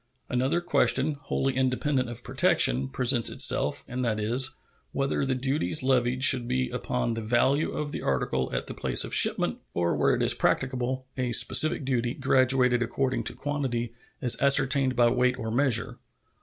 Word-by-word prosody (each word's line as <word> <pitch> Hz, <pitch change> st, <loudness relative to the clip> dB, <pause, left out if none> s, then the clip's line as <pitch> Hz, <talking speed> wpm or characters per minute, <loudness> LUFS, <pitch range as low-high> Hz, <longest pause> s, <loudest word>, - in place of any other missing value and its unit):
Another 130 Hz, +7 st, -1 dB
question, 155 Hz, -4 st, +1 dB
wholly 135 Hz, -2 st, -3 dB
independent 130 Hz, 0 st, -1 dB
of 120 Hz, 0 st, -9 dB
protection, 65 Hz, +3 st, +1 dB
presents 120 Hz, -, +2 dB
itself, -, -, +2 dB
and 125 Hz, +1 st, -5 dB
that 110 Hz, -3 st, -2 dB
is, 120 Hz, +5 st, +1 dB, 0.4 s
whether 135 Hz, 0 st, -2 dB
the 130 Hz, -1 st, -1 dB
duties 130 Hz, -, 0 dB
levied 130 Hz, -1 st, 0 dB
should 130 Hz, -4 st, +4 dB
be 130 Hz, 0 st, -2 dB
upon 125 Hz, -1 st, -3 dB
the 115 Hz, -, -5 dB
value 125 Hz, +7 st, 0 dB
of 150 Hz, -1 st, -4 dB
the -, -, -5 dB
article 65 Hz, -1 st, -2 dB
at -, -, -4 dB
the -, -, -8 dB
place -, -, +1 dB
of -, -, -7 dB
shipment, -, -, +3 dB, 0.2 s
or, 85 Hz, 0 st, 0 dB
where -, -, +1 dB
it -, -, -2 dB
is -, -, +4 dB
practicable, 130 Hz, 0 st, -2 dB
a 125 Hz, -2 st, -2 dB
specific 155 Hz, +3 st, +4 dB
duty, 125 Hz, -2 st, -2 dB
graduated 130 Hz, -2 st, +2 dB
according 125 Hz, +1 st, -2 dB
to -, -, -4 dB
quantity, 130 Hz, -5 st, -4 dB, 0.3 s
as 125 Hz, -, +1 dB
ascertained 135 Hz, -1 st, +3 dB
by 120 Hz, 0 st, +3 dB
weight 125 Hz, +1 st, 0 dB
or 110 Hz, -3 st, -5 dB
measure. 120 Hz, -2 st, 0 dB
125 Hz, 170 wpm, -26 LUFS, 120-135 Hz, 0.4 s, should